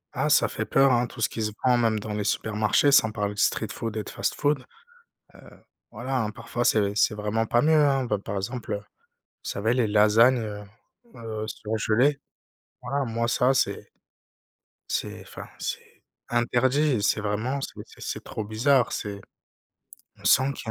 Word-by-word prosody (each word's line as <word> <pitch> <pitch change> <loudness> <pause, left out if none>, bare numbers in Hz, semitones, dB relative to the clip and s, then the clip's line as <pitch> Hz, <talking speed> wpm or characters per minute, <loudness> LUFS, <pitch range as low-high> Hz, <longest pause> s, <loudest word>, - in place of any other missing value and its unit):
Ah - - 0
ça - - +4
fait - - -4
peur, 135 0 +4
hein, 120 0 +2
tout 115 - -10
ce 110 - +2
qui 115 - -5
se 105 -1 -1
vend 125 -1 +5
même 115 -2 +1
dans 105 0 -6
les 105 0 -2
supermarchés. 110 +7 +1
Sans 110 -5 +5
parler 105 -2 -2
de 100 - -8
street 110 0 +1
food 115 -1 -5
et 110 - -2
de - - -9
fast-food. 145 -2 -1 0.7
Heu, - - -15 0.5
voilà, 125 +4 -3
hein, 110 -1 -1
parfois 115 +2 -4
c'est 100 -3 +2
c'est 105 +1 +2
vraiment 105 +2 -1
pas 120 +2 +2
mieux, 160 +1 +4
hein, 135 -2 +2
bah, 105 -4 -1
par 100 +1 -6
exemple, 115 +3 -4
heu, - - 0
vous 105 - -15 0.6
savez 110 +4 -1
les 125 -4 +1
lasagnes, 110 +4 +5
heu, 105 -2 -5 0.5
heu, 110 -2 -5
surgelées, 110 +7 0 0.6
voilà 140 +2 -2
moi 115 0 -1
ça, 125 +3 +3
c'est 130 - -1 1.0
c'est - - -3
enfin - - -10
c'est - - -6 0.3
interdit. 125 +2 +2
C'est 105 +1 +1
vraiment 110 +6 -2
c'est - - -5
c'est - - -17
c'est - - -5
trop 110 - -5
bizarre. 120 +5 +2
C'est 100 -2 -5 1.0
on - - -18
sent 135 +2 +4
qu'il 110 - -8
115 Hz, 180 wpm, -25 LUFS, 105-130 Hz, 1.0 s, vend